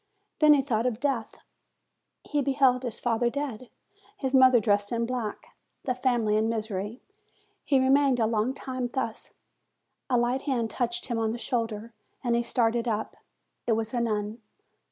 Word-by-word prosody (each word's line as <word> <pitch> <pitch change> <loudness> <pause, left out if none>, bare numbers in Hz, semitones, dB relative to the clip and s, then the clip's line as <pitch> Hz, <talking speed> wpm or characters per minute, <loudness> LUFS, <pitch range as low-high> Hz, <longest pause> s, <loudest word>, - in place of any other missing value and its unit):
Then 300 -1 +7
he 275 - +2
thought 240 -3 0
of 235 -3 -2
death: 265 -5 -1 0.9
he 295 -1 -1
beheld 265 -2 +3
his 240 -4 -4
father 240 0 +1
dead, 255 -3 -5 0.5
his 265 -5 -3
mother 260 -2 +7
dressed 205 -1 +1
in 235 -1 0
black, 235 -3 -5 0.3
the 255 - 0
family 240 -4 +1
in 220 +1 +1
misery. 215 0 -3 0.6
He 275 -3 +3
remained 265 0 +4
a 225 - +3
long 225 +3 0
time 255 -2 -4
thus. 245 -4 -3 0.8
A 250 - +3
light 240 +2 +1
hand 240 -6 -1
touched 355 - -2
him 235 -3 -2
on 220 0 0
the - - -4
shoulder, 230 -2 -3 0.3
and 240 -2 +1
he 235 - +2
started 235 0 +1
up: 220 -1 -2 0.5
it 230 - +3
was 225 +1 -2
a 240 - +1
nun. 215 0 -2
240 Hz, 165 wpm, -27 LUFS, 225-260 Hz, 0.9 s, Then